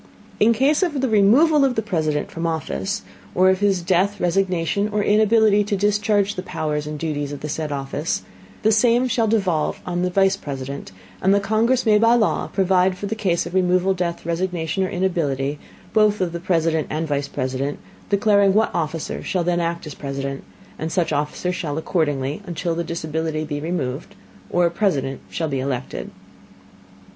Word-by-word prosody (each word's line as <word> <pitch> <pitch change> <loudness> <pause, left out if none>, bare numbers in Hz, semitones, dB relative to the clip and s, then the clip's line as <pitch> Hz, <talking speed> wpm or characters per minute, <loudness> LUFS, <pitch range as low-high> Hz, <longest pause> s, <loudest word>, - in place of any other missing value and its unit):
In 220 +2 +5
Case 270 - +2
of 325 -7 0
the 265 - +1
Removal 255 +9 +5
of 265 -2 +2
the 220 - 0
President 155 -7 -1
from 165 0 -3
Office, 190 +6 -3 0.3
or 185 +1 +5
of 190 - 0
his 195 -3 +1
Death, 190 +3 +1
Resignation, 185 +2 0
or 210 0 0
Inability 215 0 +4
to 205 -1 -1
discharge 205 0 +1
the 185 - -4
Powers 150 -4 -3
and 150 0 -4
Duties 145 -2 -3
of 145 - -7
the 150 - -4
said 155 0 -3
Office, 140 +3 -2 0.4
the 220 - +4
Same 240 +3 +3
shall 230 -2 +1
devolve 190 -8 0
on 175 -1 -2
the 180 - +1
Vice 195 +1 +3
President, 140 - -6 0.3
and 190 +1 +4
the - - +4
Congress 225 +5 +1
may 210 -1 +5
by 230 +2 +5
Law 225 -3 +1
provide 185 -1 +2
for 205 - -5
the 205 - -2
Case 190 -6 0
of 170 - -7
Removal, 185 0 +2
Death, 175 -3 -3
Resignation 175 +1 -1
or 185 - -1
Inability, 150 -7 -1 0.3
both 215 -1 +3
of 180 -2 0
the 170 - -4
President 165 -3 +1
and 160 +1 -2
Vice 145 -1 -1
President, 135 +1 -3 0.3
declaring 200 -1 +3
what 220 +1 +2
Officer 165 -1 -3
shall 180 -2 -1
then 175 0 +1
act 170 0 -2
as 150 - -7
President, 135 -1 -5 0.4
and 160 +1 -3
such 170 -3 0
Officer 150 +5 -1
shall 155 -4 -3
act 160 - -4
accordingly, 145 -2 -1
until 170 0 -2
the 170 +1 -2
Disability 160 -1 -3
be 145 -1 -4
removed, 150 -3 -4 0.3
or 175 0 +2
a 170 - +1
President 140 -9 -1
shall 160 - -2
be 135 -3 -2
elected. 130 -2 -4
180 Hz, 185 wpm, -22 LUFS, 155-205 Hz, 0.4 s, In